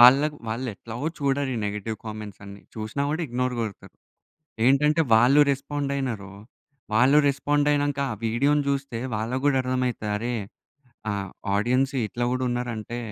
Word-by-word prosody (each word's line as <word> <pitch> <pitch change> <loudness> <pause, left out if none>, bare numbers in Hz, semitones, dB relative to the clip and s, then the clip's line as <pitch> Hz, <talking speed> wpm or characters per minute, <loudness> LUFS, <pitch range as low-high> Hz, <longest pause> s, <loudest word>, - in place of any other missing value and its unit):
వాళ్ళకి 140 +5 +7
వాళ్ళు 125 +4 -2
ఎట్లాగో 115 +8 -6
చూడరు 140 -1 0
ఈ - - -2
నెగెటివ్ 105 +2 -3
కామెంట్స్ 105 -2 -7
అన్నీ 100 0 -10
చూసినా 110 +5 -3
కూడా 160 +3 -1
ఇగ్నోర్ 125 0 -1
కొడతారు. 110 -4 -6 0.7
ఏంటంటే 150 +4 +4
వాళ్ళు 125 +6 +6
రెస్పాండ్ 140 +1 -3
అయినారు 110 -8 -3 0.6
వాళ్ళు 130 +7 +5
రెస్పాండ్ 145 +1 +1
అయినాక 145 -1 +1
ఆ - - -3
వీడియోని 140 +6 +2
చూస్తే 135 -4 -1 0.2
వాళ్ళకి 115 +5 -2
కూడా 145 -2 +4
అర్థమైతది 125 -4 -1
అరే 120 +3 -2 0.8
ఆహ్, 100 -2 -3 0.3
ఆడియన్స్ 125 +6 +2
ఇట్లా 120 +3 -3
కూడా 130 0 0
ఉన్నారు 120 0 -2
అంటే 110 +2 -5
125 Hz, 145 wpm, -25 LUFS, 110-140 Hz, 0.8 s, వాళ్ళకి